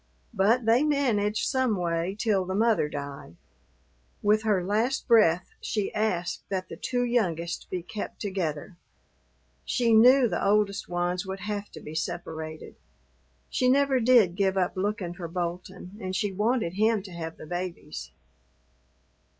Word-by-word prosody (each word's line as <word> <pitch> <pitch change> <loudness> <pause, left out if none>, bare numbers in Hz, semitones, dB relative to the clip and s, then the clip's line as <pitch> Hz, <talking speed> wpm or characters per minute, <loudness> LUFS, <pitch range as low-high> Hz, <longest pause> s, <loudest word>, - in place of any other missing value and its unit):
But 220 +4 +2
they 230 +3 +4
managed 240 -9 +1
some 260 -6 +1
way 170 +1 -1
till 210 -4 +1
the 185 +1 -3
mother 220 -7 +2
died. 140 - -7 0.9
With 210 +1 +4
her 205 -5 +1
last 225 +7 0
breath 185 -7 +4
she 210 -3 -2
asked 180 -5 -1
that 185 -1 -3
the - - -7
two 245 -1 -1
youngest 175 -9 -1
be 180 -2 -3
kept 215 +3 -6
together; 175 -5 -3 0.9
she 235 -3 +1
knew 250 +3 +7
the - - -2
oldest 200 0 +1
ones 175 +1 -1
would 190 0 -5
have 205 +1 -4
to - - -8
be 150 - -9
separated. 160 -1 -5 0.7
She 255 - +1
never 275 0 +3
did 230 -7 +5
give 195 0 +1
up 180 -2 0
looking 190 -2 -2
for 175 -1 -6
Bolton 180 +2 -5
and 185 0 -3
she 205 0 0
wanted 215 -2 0
him 215 +1 +2
to 195 - -10
have 165 -1 -6
the - - -10
babies. 175 - -5
195 Hz, 150 wpm, -27 LUFS, 175-225 Hz, 0.9 s, knew